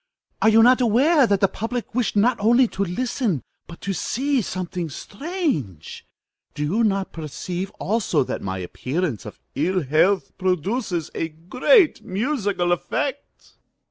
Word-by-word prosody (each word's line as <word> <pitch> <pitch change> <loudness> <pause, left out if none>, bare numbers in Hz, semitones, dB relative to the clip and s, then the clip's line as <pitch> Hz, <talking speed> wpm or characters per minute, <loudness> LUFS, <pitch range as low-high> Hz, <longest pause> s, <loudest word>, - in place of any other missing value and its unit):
Are 220 - +5
you 225 +1 +6
not 255 +2 +5
aware 260 +5 +4
that 200 -2 +1
the 195 - +5
public 230 +5 -5
wish 245 -2 0
not 230 +5 +4
only 235 +4 +4
to 200 - -2
listen, 215 - -1 0.2
but 170 - -12
to 200 - -2
see 270 - 0
something 180 -3 -4
strange? 200 - -4 0.5
Do 150 - -2
you 200 +11 +1
not 195 -3 0
perceive 175 +4 -5
also 200 -7 +1
that - - -4
my 95 -1 -3
appearance 130 - -3
of - - -10
ill 180 +4 0
health 160 +8 +2
produces 185 - -1
a 165 - -2
great 250 - +3
musical 205 -4 -1
effect? 280 - -3
195 Hz, 140 wpm, -23 LUFS, 170-245 Hz, 0.5 s, you